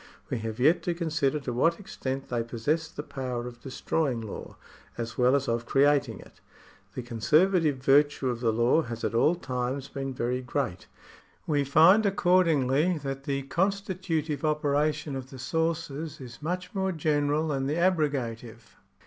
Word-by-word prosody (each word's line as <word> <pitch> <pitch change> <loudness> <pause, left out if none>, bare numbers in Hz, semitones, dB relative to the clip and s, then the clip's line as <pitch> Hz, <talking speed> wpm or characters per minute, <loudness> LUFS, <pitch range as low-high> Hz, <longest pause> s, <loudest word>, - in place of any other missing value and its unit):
We - - -1
have 110 0 -5
yet 155 +7 +4
to 175 - -2
consider 155 -4 0
to 125 -3 -4
what 165 +8 +2
extent 135 -8 -5
they 120 -2 0
possess 125 +8 -1
the 145 - -7
power 125 -4 -4
of 120 -1 -9
destroying 135 0 -1
law, 110 -3 -8 0.4
as 115 0 -4
well 125 +2 +4
as 140 -1 0
of 115 0 -1
creating 145 +1 +2
it. - - -18 0.5
The 125 - -4
conservative 150 - +2
virtue 140 +1 +3
of 120 -2 -1
the 115 -2 +1
law 120 +8 +3
has 115 -5 -6
at - - -1
all 150 +9 +3
times 130 -2 -3
been 135 -1 -4
very 125 0 -2
great. 125 -7 -3 0.6
We 145 -2 +1
find, 165 +10 +6
accordingly, 175 -5 +2
that 135 -2 -5
the 140 -1 -1
constitutive 175 -3 -1
operation 150 -1 0
of 130 -1 -6
the 135 - -10
sources 160 +1 -2
is 125 -1 -10
much 180 +3 -4
more 190 -1 0
general 150 -1 0
than 135 -2 -1
the 145 - 0
abrogative. 130 - -1
140 Hz, 160 wpm, -27 LUFS, 125-160 Hz, 0.6 s, find